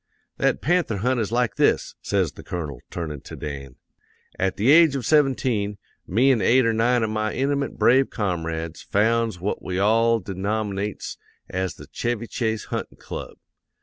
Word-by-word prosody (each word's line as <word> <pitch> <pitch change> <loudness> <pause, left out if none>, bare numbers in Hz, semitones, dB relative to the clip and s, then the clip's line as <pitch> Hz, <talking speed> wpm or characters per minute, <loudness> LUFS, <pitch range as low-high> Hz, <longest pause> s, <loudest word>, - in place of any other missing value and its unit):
"'That - - +1
panther 170 - +1
hunt 125 +5 +1
is 110 -2 -1
like 120 -2 0
this,' - - +2
says - - 0
the - - -12
Colonel, 75 -7 -5
turnin' 75 -5 -5
to - - -9
Dan. 70 -3 -7 0.6
'At 95 0 0
the 115 +7 +4
age 160 -2 +7
of 130 -4 -3
seventeen, 125 -9 +2 0.3
me 125 +9 +4
an' 120 -5 +2
eight 130 +4 +4
or 115 - +2
nine 120 +2 +2
of 110 - -1
my 110 0 -1
intimate 140 +2 -1
brave 130 +2 +4
comrades 80 -5 -3
founds 110 -1 +1
what 100 +4 -2
we 90 -1 -3
all 115 +3 +3
denom'nates 100 +1 -3 0.3
as 95 -1 -3
the - - -11
"Chevy 120 -1 -3
Chase 110 0 -2
Huntin' - - -4
Club." - - -8
110 Hz, 165 wpm, -24 LUFS, 95-125 Hz, 0.6 s, age